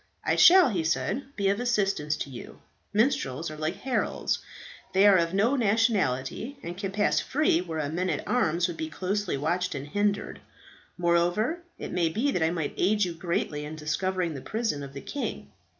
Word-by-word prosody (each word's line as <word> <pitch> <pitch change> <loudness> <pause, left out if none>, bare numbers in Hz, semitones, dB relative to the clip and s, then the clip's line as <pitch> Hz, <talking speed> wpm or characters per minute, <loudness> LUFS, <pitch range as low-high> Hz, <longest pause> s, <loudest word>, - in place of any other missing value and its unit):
"I - - +2
shall," 365 -3 +8
he 180 -7 -1
said, 160 - -1
"be 200 -2 +1
of 200 +2 +1
assistance 200 -11 0
to 140 - -5
you. 120 - -10 0.3
Minstrels 170 - 0
are - - -7
like 155 +1 -2
heralds. 260 -1 -1 0.5
They 190 +2 +5
are 200 -2 +7
of 170 +1 0
no 225 +7 +3
nationality, 220 - 0
and 175 - -5
can 195 +1 -4
pass 205 +1 +2
free 280 - +1
where 165 -3 -5
a 150 -2 -1
man 175 +5 -1
at 150 - -3
arms 175 -7 +2
would 175 -2 -6
be 160 - -4
closely 190 +1 -2
watched 175 +4 -1
and 135 0 -5
hindered. 205 +4 -1 0.6
Moreover, 175 - +1 0.2
it - - -6
may 170 -2 +1
be 235 - 0
that 180 - -1
I 160 - +3
might 165 -3 -2
aid 210 +3 +2
you 175 - -4
greatly 165 -3 -2
in 150 +1 -6
discovering 175 +3 -1
the 135 - -7
prison 220 - -2
of 140 -1 -8
the 140 - -7
king. 285 - -5
180 Hz, 190 wpm, -27 LUFS, 155-210 Hz, 0.6 s, shall